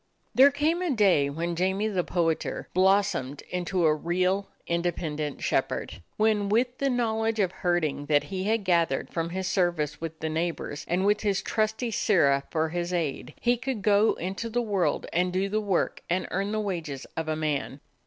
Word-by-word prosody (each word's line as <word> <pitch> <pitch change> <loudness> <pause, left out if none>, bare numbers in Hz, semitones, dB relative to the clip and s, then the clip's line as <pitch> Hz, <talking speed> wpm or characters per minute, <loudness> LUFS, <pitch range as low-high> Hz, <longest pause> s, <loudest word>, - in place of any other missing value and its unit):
There 270 +2 +8
came 305 +5 0
a 360 - 0
day 195 - +3
when 170 +4 -3
"Jamie 190 +4 0
the 190 -4 0
Poeter" 165 -3 -1
blossomed 185 -7 +2
into 180 0 0
a 155 - +5
real, 180 +5 0 0.2
independent 165 -4 -2
shepherd; 95 - -1 0.2
when 215 -2 +2
with 245 +4 +1
the 275 - +1
knowledge 225 -3 0
of 190 -3 +2
herding 170 -6 -1
that 145 -1 +3
he 190 0 -2
had 220 0 +1
gathered 170 -7 +1
from 165 0 -1
his 190 +2 -3
service 175 -6 0
with 160 -1 -5
the 160 - -2
neigh 160 +2 0
bors, 145 -3 -6
and 180 +3 +1
with 210 +1 +3
his 200 -3 0
trusty 220 +2 -1
Sirrah 140 -11 +3
for 160 -1 0
his 175 +1 -3
aide, 165 -6 -2
he 245 0 +2
could 245 -4 -4
go 210 +1 +4
into 190 +6 -4
the 240 +2 0
world 205 -6 0
and 180 +2 +1
do 190 +2 0
the 215 +2 0
work 200 -4 0
and 180 +2 0
earn 195 +2 -1
the 215 - -1
wages 165 -10 -4
of 160 -1 -3
a 155 - 0
man. 150 -3 -2
185 Hz, 185 wpm, -27 LUFS, 165-210 Hz, 0.2 s, There